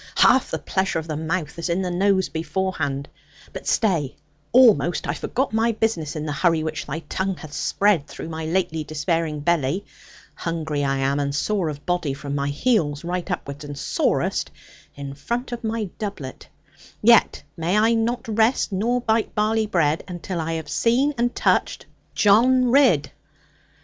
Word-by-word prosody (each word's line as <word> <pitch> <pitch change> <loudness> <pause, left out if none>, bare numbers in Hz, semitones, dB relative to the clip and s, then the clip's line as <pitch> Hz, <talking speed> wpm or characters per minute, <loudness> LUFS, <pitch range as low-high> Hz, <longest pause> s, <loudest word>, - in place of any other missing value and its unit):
Half 260 +1 +5
the - - -2
pleasure 190 -3 -1
of 160 0 -4
the 155 - -3
mouth 160 0 -3
is 170 - -3
in 175 +3 0
the 180 - -2
nose 190 +1 +2
beforehand. 155 -2 -2 0.5
But - - -8
stay, 160 - +1 0.4
almost 230 -8 +5
I 145 - 0
forgot 250 - -2
my 225 +1 +2
business, 175 -9 -1
in 155 0 -4
the 150 - -3
hurry 160 +1 +2
which 155 0 -4
thy 150 +3 -4
tongue 190 +4 -3
hath 155 -2 -10
spread 195 -7 +1
through - - -8
my 160 0 -5
lately 160 -2 0
despairing 155 0 -2
belly. 170 +3 0 0.5
Hungry 160 -3 -3
I 135 -1 0
am, 135 +1 0
and 140 0 -1
sore 190 0 0
of 145 -1 -8
body, 175 -6 -1
from 140 0 -6
my 140 0 -1
heels 150 - 0
right 180 +2 -3
upward, 145 -5 -4
and 145 -1 -7
sorest - - 0 0.5
in 140 -1 -7
front 235 - -4
of 240 0 -5
my 220 -4 -2
doublet, 195 -11 -6 0.6
yet 235 +1 +5
may 170 +5 0
I 225 +2 +4
not 230 +2 -1
rest 225 +2 +2
nor 235 +6 0
bite 220 -1 0
barley 215 +1 +1
bread, 160 -5 +1
until 175 -1 -4
I 165 +1 -2
have 160 -1 -4
seen 260 +6 +2
and 240 +1 0
touched - - +1 0.3
John 245 +4 +4
Ridd. 250 - +4
175 Hz, 170 wpm, -23 LUFS, 150-220 Hz, 0.6 s, Half